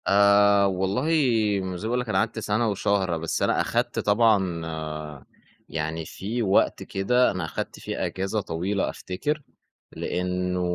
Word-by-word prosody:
آآ 100 0 +5
والله 95 +6 0 0.6
م 95 -1 -4
زي 105 - -4
ما - - -2
باقول 125 - +1
لك 125 -2 -4
أنا 95 - +1
قعدت 110 +2 0
سنة 110 +2 0
وشهر، 95 -3 0
بس 80 0 -2
أنا - - +2
أخدت - - -1
طبعًا 100 -6 +2 1.1
يعني 80 +1 -3
في 110 +9 -4
وقت 95 -2 +2
كده، 125 +6 +2
أنا 90 - -3
أخدت - - -5
فيه - - -3
أجازة 95 +3 -2
طويلة 95 +3 -2
أفتكر. 145 +12 -3 0.5
لأنه 90 0 -2
100 Hz, 145 wpm, -25 LUFS, 90-105 Hz, 1.1 s, آآ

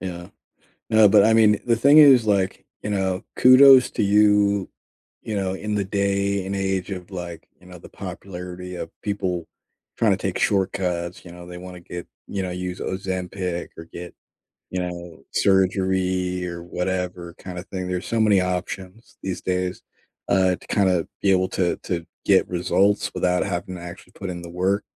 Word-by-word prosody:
Yeah. 90 -1 -6 0.6
No, 110 -2 +6
but, 100 0 +6
I 110 - +4
mean, 110 -2 +5
the 115 - +3
thing 140 +6 +5
is, 135 -6 +8
like, 100 -3 0 0.2
you 105 - -3
know, 95 0 -1
kudos 130 0 +8
to - - -1
you, 100 -1 +3 0.5
you 110 - -4
know, 95 -1 -1
in 105 +2 -3
the 100 - 0
day 100 0 0
and 100 +1 -3
age 95 -1 -1
of, 90 0 -7
like, 90 -3 -7
you 90 - -21
know, 90 -1 -11
the - - -13
popularity 90 -1 -8
of - - -6
people 90 -4 -2 0.5
tryna - - +3
take - - -2
shortcuts, 90 -3 -1
you 85 - -10
know, 85 0 -11
they 90 0 -9
wanna 90 0 -9
get 85 0 -8 0.2
you 100 - -3
know, 90 - -3
use 90 0 -5
Ozempic 95 -1 -3
or 80 - -9
get, 85 +1 -10 0.5
you 95 - -3
know, 85 -4 -7
surgery 95 -1 +1
or 85 -1 -6
whatever 90 -1 -3
kind 90 -1 -8
of 95 - -10
thing, 95 -1 -5
there's 90 0 -3
so 115 - -1
many 105 -3 +4
options 90 +3 -5
these 95 -2 -4
days, 90 0 -2 0.5
uh, 95 -2 +3
to - - -18
kinda 95 -5 +2 0.2
be 100 - +3
able 95 0 +2
to 90 -2 0
to 85 -2 -3 0.2
get 95 -2 +4
results 95 +3 +1
without 90 0 +1
having 90 0 -4
to 85 - -9
actually 85 0 -11
put 95 -2 -6
in 85 -1 -5
the 85 - -9
work. 95 +4 0
95 Hz, 180 wpm, -23 LUFS, 90-100 Hz, 0.6 s, is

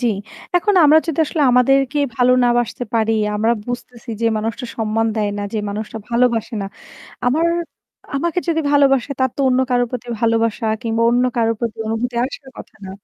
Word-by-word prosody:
জ্বি। 245 - +1 0.5
এখন 400 +4 +2
আমরা 300 +2 +7
যদি 325 -3 -3
আসলে 315 - -3
আমাদেরকে 270 +3 +3 0.2
ভালো 250 0 +4
না - - +4
বাসতে 240 +1 -2
পারি, 225 -1 +2 0.2
আমরা 220 +3 +2
বুঝতেছি 245 -1 -7
যে 230 - +1
মানুষটা 225 +4 -3
সম্মান 225 0 0
দেয় 210 -1 0
না, - - -3
যে 220 - -1
মানুষটা 210 +2 -5
ভালোবাসে 235 -1 +1
না। - - -3 0.6
আমার 310 +7 +2 0.7
আমাকে 340 +5 -1
যদি 325 -1 +2
ভালোবাসে 280 -2 +3
তার 260 0 +2
তো - - -3
অন্য 255 0 +2
কারো 245 -1 +3
প্রতি 245 -1 -6
ভালোবাসা 230 0 +1 0.2
কিংবা 230 0 0
অন্য 245 +1 +2
কারো 230 -1 +2
প্রতি 235 -2 -3
অনুভূতি 225 +3 -2
আসার 265 0 -8
কথা - - -11
না। - - -7
245 Hz, 180 wpm, -19 LUFS, 225-265 Hz, 0.7 s, আমরা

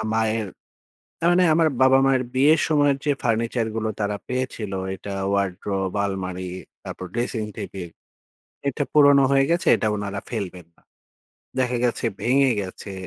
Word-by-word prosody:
মায়ের 110 -1 0 0.7
তা - - -6
মানে 180 +1 +4
আমার 165 0 +4
বাবা-মায়ের 130 0 +4
বিয়ের 145 +4 +5
সময়ের 145 -3 +3
যে 145 - +2
ফার্নিচার 115 -1 0
গুলো 110 0 -1
তারা 105 0 -1
পেয়েছিল 125 -5 -3 0.2
এটা 100 +1 -7 0.2
ওয়ারড্রোব, 95 -1 -1
আলমারি, 95 -2 -4 0.3
তারপর 95 - -7
ড্রেসিং 120 -2 -2
টেবিল 90 -3 -6 0.8
এটা 140 +2 0
পুরনো 140 -2 +6
হয়ে 135 0 +4
গেছে 175 +1 0
এটা 110 - -1
উনারা 100 -1 -4
ফেলবেন 95 -6 -5
না। - - -29 0.8
দেখা 125 -1 +1
গেছে 120 0 0 0.2
ভেঙে 135 +2 +3
গেছে, 95 +1 -7
115 Hz, 140 wpm, -23 LUFS, 100-135 Hz, 0.8 s, পুরনো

